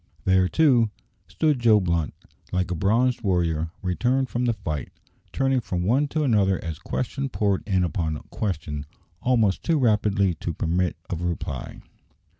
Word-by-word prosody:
There, 95 -1 +4
too, 125 - +4 0.4
stood 150 -4 +1
Joe 115 -3 +5
Blunt, 85 -5 -1 0.4
like 90 0 -1
a - - 0
bronzed 115 +8 +2
warrior 85 -5 0
returned 125 +8 +1
from 120 +1 -1
the 120 - +2
fight, 85 -9 -4 0.4
turning 135 -1 +1
from 90 -5 -3
one 130 +10 +2
to 155 +2 -1
another 100 -8 +3
as 80 -2 -5
question 135 +2 -3
poured 100 -6 0
in 95 -3 +2
upon 80 -4 -1
question 75 -8 -3 0.3
almost 115 -6 +2
too 165 -2 +1
rapidly 105 -6 +2
to 85 +1 -4
permit 90 +1 0
of 85 -2 -4
a - - -2
reply. 85 - -5
100 Hz, 155 wpm, -25 LUFS, 90-125 Hz, 0.4 s, Joe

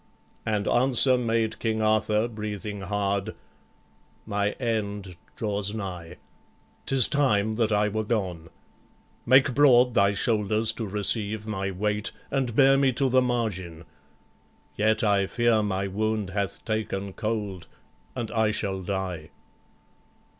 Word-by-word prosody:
And 105 -1 -1
answer 130 +1 +4
made 115 -2 -1
King 110 -1 -1
Arthur, 110 +1 +2
breathing 105 -2 -6
hard: 100 +1 -2 0.9
"My 105 -1 -1
end 105 -6 -3 0.2
draws 105 -1 -2
nigh; 90 -5 -6 0.7
't 135 - -1
is 130 - +6
time 110 -8 +1
that 110 0 0
I 105 0 +2
were 110 +1 -2
gone. 95 -7 -3 0.8
Make 130 +1 +5
broad 125 -3 +5
thy 100 -1 +3
shoulders 110 +1 +1
to 110 - -5
receive 105 +1 0
my 100 -3 -3
weight, 105 +2 -1 0.2
And 130 -4 -1
bear 135 0 +5
me 135 -1 +3
to 135 +2 +1
the 130 +1 +4
margin; 100 -9 -3 0.9
yet 110 +1 +2
I 100 -2 +2
fear 120 -1 +2
My 100 -1 -2
wound 105 0 -2
hath 100 -1 -3
taken 100 -3 -3
cold, 105 -5 -4 0.5
and 120 -4 -4
I 110 -2 +2
shall 100 -3 -1
die." 90 -4 -4
105 Hz, 130 wpm, -26 LUFS, 100-115 Hz, 0.9 s, is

